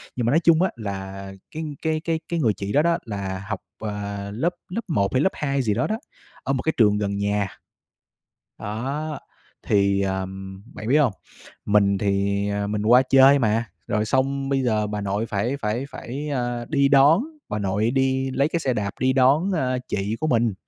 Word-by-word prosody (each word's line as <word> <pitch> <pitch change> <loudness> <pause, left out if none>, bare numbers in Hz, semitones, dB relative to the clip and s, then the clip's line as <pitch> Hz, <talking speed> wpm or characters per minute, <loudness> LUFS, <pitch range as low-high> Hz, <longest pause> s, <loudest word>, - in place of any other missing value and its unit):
Nhưng 120 - -1
mà - - +2
nói 160 - +4
chung 165 0 +5
á, 185 - +3
là 95 -3 -6 0.2
cái 160 +1 -5 0.2
cái 160 -1 0
cái 165 0 -1
cái 170 -1 -1
người 115 -8 +2
chị 100 +1 -5
đó 145 - +5
đó, 170 +1 +2
là 100 -3 -4
học, 110 - -3 0.2
à, 100 -1 -4
lớp 165 +11 -1
lớp 215 +6 -3
1 100 - 0
hay 130 - +3
lớp 190 - +3
2 140 -2 -1
gì 110 -5 +1
đó 120 +5 0
đó, 220 - -1 0.5
ở 135 - 0
một 130 - -1
cái 160 - +1
trường 105 -3 +4
gần 100 -1 -1
nhà. 100 0 0 1.1
Đó, 140 +8 -4 0.5
thì, 100 -1 +3
ờm, 95 0 -4
bạn 110 - -6
biết 145 - +5
hông? 140 -8 +3 0.5
Mình 100 -1 +3
thì, 100 0 0
à, 100 0 -1
mình 105 0 -2
qua 125 +3 +7
chơi 135 +2 +6
mà, 115 -1 +1 0.2
rồi 105 0 0
xong 135 +4 0
bây 135 -1 +1
giờ 110 -4 +1
bà 105 0 -3
nội 100 +3 -1
phải 115 +6 -1
phải 110 +4 -1
phải, 140 +5 -6
à, 120 -4 -2
đi 140 -3 +3
đón, 145 - +6 0.3
bà 105 - -2
nội 100 +3 0
đi 130 0 +1
lấy 140 +2 +1
cái 170 +1 -1
xe 130 -5 0
đạp 100 -3 -2
đi 130 0 +3
đón, 135 +8 +3
ơ, 130 -6 0
chị 100 +3 -2
của 155 - 0
mình. 115 -6 +2
120 Hz, 205 wpm, -23 LUFS, 100-140 Hz, 1.1 s, qua